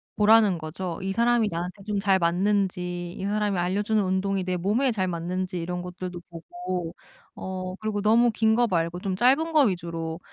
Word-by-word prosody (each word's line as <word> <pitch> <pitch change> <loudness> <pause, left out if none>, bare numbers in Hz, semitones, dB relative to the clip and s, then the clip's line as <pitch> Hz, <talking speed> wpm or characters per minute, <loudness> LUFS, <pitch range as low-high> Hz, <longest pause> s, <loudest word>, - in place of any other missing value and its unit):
보라는 210 -3 +5
거죠. 165 +2 -5
이 195 0 -2
사람이 235 0 +2
나한테 180 +4 -5
좀 210 0 -2
잘 195 -1 +3
맞는지 180 -1 0
이 - - -5
사람이 205 -1 0
알려 185 +4 0
주는 215 0 +1
운동이 190 0 0
내 185 0 -2
몸에 215 +9 +1
잘 190 -5 -1
맞는지 180 +1 -3
이런 180 +1 -3
것들도 180 0 -6
보고 180 - -5 0.4
어 185 0 -5
그리고 215 -1 -2
너무 230 +3 +4
긴 220 0 +2
거 240 +1 +3
말고 170 -3 -1
좀 190 0 -2
짧은 275 - +3
거 310 - +6
위주로 165 -4 -3
190 Hz, 345 characters per minute, -25 LUFS, 175-210 Hz, 0.4 s, 거